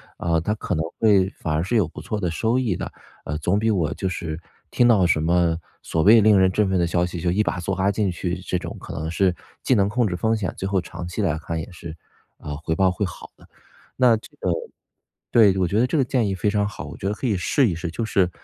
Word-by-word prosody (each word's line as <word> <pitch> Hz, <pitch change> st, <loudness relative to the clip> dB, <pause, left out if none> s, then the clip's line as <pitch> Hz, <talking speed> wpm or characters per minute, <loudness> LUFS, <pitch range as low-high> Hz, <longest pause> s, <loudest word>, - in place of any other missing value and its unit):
啊， 85 Hz, -1 st, 0 dB
它 95 Hz, +6 st, -1 dB
可 100 Hz, -, -3 dB
能 80 Hz, 0 st, -1 dB
会 100 Hz, -4 st, +4 dB
反 80 Hz, -, -4 dB
而 75 Hz, -, +1 dB
是 100 Hz, +8 st, -2 dB
有 105 Hz, -5 st, +4 dB
不 -, -, -10 dB
错 105 Hz, -1 st, -4 dB
的 90 Hz, -3 st, -1 dB
收 115 Hz, +8 st, 0 dB
益 115 Hz, -9 st, 0 dB
的， -, -, -4 dB, 0.4 s
呃， 75 Hz, -, -3 dB
总 90 Hz, +6 st, +1 dB
比 110 Hz, +1 st, +1 dB
我 85 Hz, -8 st, +1 dB
就 95 Hz, -, -2 dB
是 80 Hz, -3 st, -4 dB, 0.3 s
听 120 Hz, -, +4 dB
到 105 Hz, -6 st, +5 dB
什 80 Hz, -3 st, +2 dB
么 85 Hz, 0 st, +2 dB, 0.2 s
所 80 Hz, -, -1 dB
谓 110 Hz, +3 st, +7 dB
令 105 Hz, -1 st, +5 dB
人 95 Hz, 0 st, +5 dB
振 100 Hz, +1 st, +1 dB
奋 95 Hz, -1 st, +1 dB
的 85 Hz, -, +2 dB
消 85 Hz, +1 st, +1 dB
息， 90 Hz, 0 st, -5 dB
就 85 Hz, -, 0 dB
一 105 Hz, +4 st, +2 dB
把 95 Hz, -, -2 dB
梭 95 Hz, +2 st, -2 dB
哈 95 Hz, +1 st, +1 dB
进 100 Hz, -1 st, 0 dB
去 90 Hz, 0 st, -3 dB
这 90 Hz, 0 st, -2 dB
种， -, -, -7 dB
可 -, -, -9 dB
能 80 Hz, +2 st, -3 dB
是 90 Hz, 0 st, +2 dB, 0.3 s
既 130 Hz, -, +3 dB
能 100 Hz, -2 st, +2 dB
控 120 Hz, +1 st, +1 dB
制 90 Hz, -, -2 dB
风 110 Hz, +5 st, +1 dB
险， 100 Hz, -4 st, -3 dB
最 -, -, -5 dB
后 100 Hz, -1 st, +2 dB
长 85 Hz, 0 st, -7 dB
期 90 Hz, +5 st, -4 dB
来 85 Hz, -6 st, 0 dB
看 80 Hz, +1 st, -4 dB
也 80 Hz, -, -6 dB
是， 85 Hz, -2 st, -9 dB, 0.4 s
呃， 75 Hz, -, -6 dB
回 80 Hz, +2 st, -3 dB
报 95 Hz, -1 st, +4 dB
会 90 Hz, +3 st, -1 dB
好 90 Hz, -, -9 dB
的。 -, -, -19 dB, 0.5 s
那 125 Hz, -3 st, +5 dB
这 110 Hz, -, -9 dB
个 -, -, -1 dB, 0.8 s
对， 105 Hz, -5 st, +5 dB
我 95 Hz, -2 st, +1 dB
觉 100 Hz, -, 0 dB
得 120 Hz, -, +4 dB
这 130 Hz, -, -1 dB
个 140 Hz, -, +3 dB
建 125 Hz, -2 st, 0 dB
议 100 Hz, -, -1 dB
非 100 Hz, +2 st, 0 dB
常 105 Hz, -1 st, +1 dB
好， 105 Hz, -, -7 dB
我 -, -, -9 dB
觉 -, -, -6 dB
得 105 Hz, -, -1 dB
可 125 Hz, -, -3 dB
以 105 Hz, -, +1 dB
试 120 Hz, +8 st, +2 dB
一 90 Hz, -, -1 dB
试， 85 Hz, +1 st, -4 dB
就 115 Hz, +7 st, -3 dB
是， 95 Hz, -4 st, +2 dB
95 Hz, 295 characters per minute, -23 LUFS, 85-105 Hz, 0.8 s, 谓